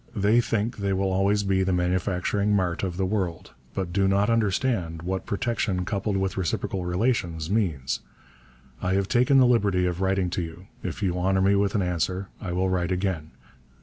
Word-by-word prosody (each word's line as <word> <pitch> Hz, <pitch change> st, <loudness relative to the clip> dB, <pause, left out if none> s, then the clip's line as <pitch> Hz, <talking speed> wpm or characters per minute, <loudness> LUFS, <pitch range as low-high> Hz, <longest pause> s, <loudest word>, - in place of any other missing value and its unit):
They 105 Hz, +4 st, +4 dB
think 115 Hz, 0 st, -1 dB
they 100 Hz, -1 st, -1 dB
will 95 Hz, 0 st, 0 dB
always 100 Hz, +2 st, +2 dB
be 95 Hz, -1 st, +1 dB
the 95 Hz, 0 st, +1 dB
manufacturing 95 Hz, +3 st, +1 dB
mart 90 Hz, -4 st, 0 dB
of 90 Hz, -3 st, -3 dB
the 95 Hz, -, +1 dB
world, 95 Hz, -4 st, -2 dB, 0.2 s
but 90 Hz, -3 st, -3 dB
do 95 Hz, 0 st, +2 dB
not 100 Hz, +3 st, +2 dB
understand 100 Hz, -6 st, 0 dB
what 95 Hz, +1 st, -3 dB
protection 100 Hz, -4 st, -1 dB
coupled 100 Hz, +1 st, -1 dB
with 95 Hz, 0 st, -1 dB
reciprocal 95 Hz, 0 st, -2 dB
relations 90 Hz, -4 st, -1 dB
means. 85 Hz, -12 st, 0 dB, 0.8 s
I 95 Hz, +1 st, +1 dB
have 100 Hz, -1 st, +1 dB
taken 125 Hz, +4 st, +4 dB
the 130 Hz, -, +7 dB
liberty 100 Hz, -7 st, +3 dB
of 90 Hz, 0 st, -2 dB
writing 95 Hz, -2 st, +1 dB
to 90 Hz, -, -1 dB
you; 85 Hz, +2 st, -8 dB, 0.2 s
if 90 Hz, +3 st, -4 dB
you 90 Hz, -2 st, 0 dB
honour 95 Hz, +1 st, +2 dB
me 100 Hz, +1 st, +4 dB
with 100 Hz, 0 st, +1 dB
an 100 Hz, -, +2 dB
answer 90 Hz, +2 st, -1 dB
I 90 Hz, -, -4 dB
will 90 Hz, +2 st, +1 dB
write 90 Hz, -1 st, 0 dB
again. 90 Hz, -4 st, -1 dB
95 Hz, 185 wpm, -26 LUFS, 90-100 Hz, 0.8 s, the